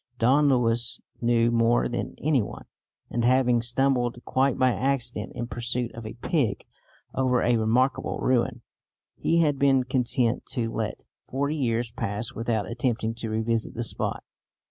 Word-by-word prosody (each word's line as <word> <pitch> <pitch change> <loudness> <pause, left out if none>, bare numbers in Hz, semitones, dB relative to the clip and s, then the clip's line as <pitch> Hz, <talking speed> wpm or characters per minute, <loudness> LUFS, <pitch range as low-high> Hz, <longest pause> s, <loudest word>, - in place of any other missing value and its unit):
Don 140 +6 +4
Luis 120 -2 +1 0.2
knew 120 0 +3
more 115 0 +3
than 120 - -4
any 145 -4 +2
one, 100 - -7 0.5
and, 120 - -1
having 125 -1 +3
stumbled, 120 0 +1
quite 130 0 +1
by 130 -1 +3
accident 125 -1 0
in 120 - -3
pursuit 120 0 -3
of 115 -1 -7
a 110 - -8
pig, 130 - 0 0.5
over 130 -2 +1
a 120 0 +3
remarkable 120 +5 +1
ruin, 125 -1 0 0.5
he 170 0 +2
had 145 -4 +1
been 135 -2 +4
content 125 -1 +1
to 115 -2 -1
let 110 -1 -3 0.3
forty 140 +3 -1
years 120 -4 -1
pass 110 +2 -3
without 115 -3 -1
attempting 115 -2 -1
to 115 -1 -5
revisit 110 +1 -1
the 120 - -2
spot. 115 - -1
120 Hz, 150 wpm, -26 LUFS, 115-130 Hz, 0.5 s, Don